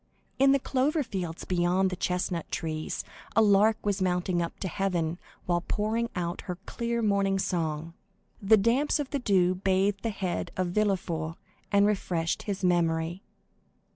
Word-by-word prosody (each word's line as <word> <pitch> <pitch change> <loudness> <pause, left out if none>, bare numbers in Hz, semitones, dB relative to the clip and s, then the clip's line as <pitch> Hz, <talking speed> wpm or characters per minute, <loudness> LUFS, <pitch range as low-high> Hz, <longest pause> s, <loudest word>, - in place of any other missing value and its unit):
In 270 0 +6
the 275 - +5
clover 280 +4 0
fields 180 -8 -5
beyond 180 +1 +2
the - - -2
chestnut 180 -2 -2
trees, 155 -1 -3 0.3
a 225 - +6
lark 210 +1 +5
was 200 -1 0
mounting 180 -1 +1
up 170 - -4
to 190 - -1
heaven, 175 -3 -1 0.3
while 175 -1 +1
pouring 220 +5 -1
out 175 0 -2
her 180 - -1
clear 235 -1 -2
morning 200 -2 +2
song. 165 -3 -2 0.5
The 215 +2 +6
damps 240 +8 +2
of 290 -3 -4
the 285 - 0
dew 185 -6 +3
bathed 195 +1 +1
the 230 - -1
head 190 -4 -3
of 185 -1 0
Villefort, 175 -5 -1 0.4
and 200 0 +5
refreshed 175 -5 0
his 195 -2 -4
memory. 170 0 +1
190 Hz, 155 wpm, -28 LUFS, 175-210 Hz, 0.5 s, In